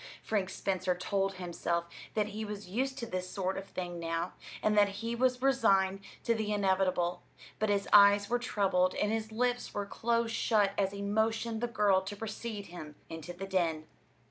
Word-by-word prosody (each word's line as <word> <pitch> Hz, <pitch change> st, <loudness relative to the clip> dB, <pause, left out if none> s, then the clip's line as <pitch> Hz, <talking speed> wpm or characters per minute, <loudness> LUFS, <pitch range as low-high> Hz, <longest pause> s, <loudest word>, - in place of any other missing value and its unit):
Frank 200 Hz, -4 st, 0 dB
Spencer 185 Hz, -2 st, -1 dB
told 195 Hz, +2 st, -1 dB
himself 170 Hz, -1 st, -2 dB, 0.3 s
that 210 Hz, -1 st, +1 dB
he 215 Hz, +1 st, -5 dB
was 210 Hz, -2 st, -6 dB
used 260 Hz, +7 st, -1 dB
to 235 Hz, -, -3 dB
this 185 Hz, -4 st, -4 dB
sort 190 Hz, -1 st, -2 dB
of 195 Hz, 0 st, -6 dB
thing 175 Hz, -1 st, -5 dB
now, 165 Hz, +1 st, -2 dB, 0.3 s
and 215 Hz, 0 st, +3 dB
that 205 Hz, -1 st, +5 dB
he 225 Hz, +4 st, -4 dB
was 255 Hz, +1 st, +1 dB
resigned 195 Hz, -8 st, +3 dB, 0.2 s
to 235 Hz, -, +2 dB
the 220 Hz, -2 st, -2 dB
inevitable; 190 Hz, -3 st, +1 dB, 0.4 s
but 215 Hz, -, +1 dB
his 200 Hz, -1 st, +1 dB
eyes 205 Hz, 0 st, +7 dB
were 245 Hz, +1 st, +1 dB
troubled, 190 Hz, -6 st, +1 dB
and 210 Hz, -, +1 dB
his 220 Hz, 0 st, -2 dB
lips 245 Hz, +2 st, -1 dB
were 205 Hz, -1 st, -1 dB
close 230 Hz, +2 st, 0 dB
shut 210 Hz, -3 st, +2 dB
as 195 Hz, -1 st, +1 dB
he 200 Hz, 0 st, -5 dB
motioned 220 Hz, +2 st, 0 dB
the 240 Hz, -, +1 dB
girl 205 Hz, -4 st, +3 dB
to 190 Hz, +2 st, -6 dB
precede 215 Hz, 0 st, -5 dB
him 155 Hz, -4 st, -9 dB, 0.2 s
into 165 Hz, +1 st, -6 dB
the 175 Hz, +2 st, -6 dB
den. 170 Hz, -5 st, 0 dB
200 Hz, 185 wpm, -32 LUFS, 185-220 Hz, 0.4 s, eyes